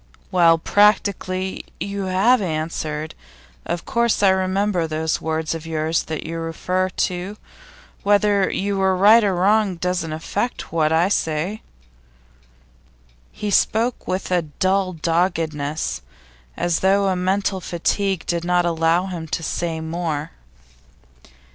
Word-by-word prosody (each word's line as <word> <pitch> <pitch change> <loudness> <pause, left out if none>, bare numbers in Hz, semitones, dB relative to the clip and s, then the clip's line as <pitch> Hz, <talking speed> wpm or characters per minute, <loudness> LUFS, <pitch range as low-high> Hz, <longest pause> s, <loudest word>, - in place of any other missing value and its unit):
'Well, 170 -2 +5
practically 190 -1 +1 0.2
you 200 -1 -3
have 195 +7 +3
answered. 155 -2 -3 0.5
Of 170 - -3
course 235 -3 +1
I 195 - +7
remember 190 -1 +1
those 160 0 -1
words 160 0 -2
of 165 0 -7
yours 160 0 0
that 160 0 -5
you 165 +1 -4
refer 180 +3 -1
to. 185 +3 -3 0.6
Whether 205 -1 +3
you 200 0 -1
were 190 -1 +2
right 215 +4 +7
or 195 -3 +1
wrong 200 +1 +2
doesn't 180 -1 -2
affect 195 +10 -3
what 155 -2 +2
I 165 +3 +3
say.' 170 +3 -1 1.7
He 210 -1 -4
spoke 230 +4 +1
with 185 0 -3
a 180 -1 +3
dull 185 +4 0
doggedness, 160 -3 -1 0.6
as 175 -1 0
though 195 0 +2
mental 190 +1 0
fatigue 190 +2 -1
did 170 -1 -1
not 175 0 +2
allow 165 +1 +2
him 175 -4 -6
to 165 - -3
say 165 0 -2
more. 160 -2 -3
180 Hz, 125 wpm, -21 LUFS, 165-195 Hz, 1.7 s, I